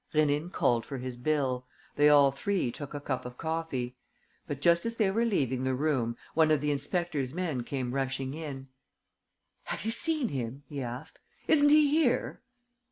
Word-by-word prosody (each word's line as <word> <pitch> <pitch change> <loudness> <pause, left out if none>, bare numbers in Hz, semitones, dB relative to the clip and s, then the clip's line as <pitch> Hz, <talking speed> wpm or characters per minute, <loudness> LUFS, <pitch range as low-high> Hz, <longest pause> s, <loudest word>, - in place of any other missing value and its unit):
Rénine 150 +2 +2
called 120 -8 +2
for 140 - -6
his 125 0 -5
bill. 130 -1 -1 0.3
They 145 0 +5
all 140 -2 +6
three 175 -1 -1
took 145 +3 -7
a - - -3
cup 135 -2 -3
of 125 0 -9
coffee. 160 -7 -3 0.5
But, 145 - -4
just 170 +3 +4
as 230 0 -2
they 210 -4 +2
were 230 +4 +1
leaving 130 - 0
the 130 0 0
room, 125 -5 0 0.2
one 160 -1 +4
of 155 -2 +4
the 150 +1 0
inspector's 145 -2 -2
men 165 -8 -1
came 125 0 -3
rushing 135 0 -2
in: 140 -4 -7 1.0
"Have - - -4
you 225 - 0
seen 310 0 +1
him?" 130 +1 -4
he 145 -3 -5
asked. 125 +5 -7 0.3
"Isn't 290 -1 +5
he 300 0 +6
here?" 300 -5 +1
145 Hz, 175 wpm, -29 LUFS, 130-170 Hz, 1.0 s, all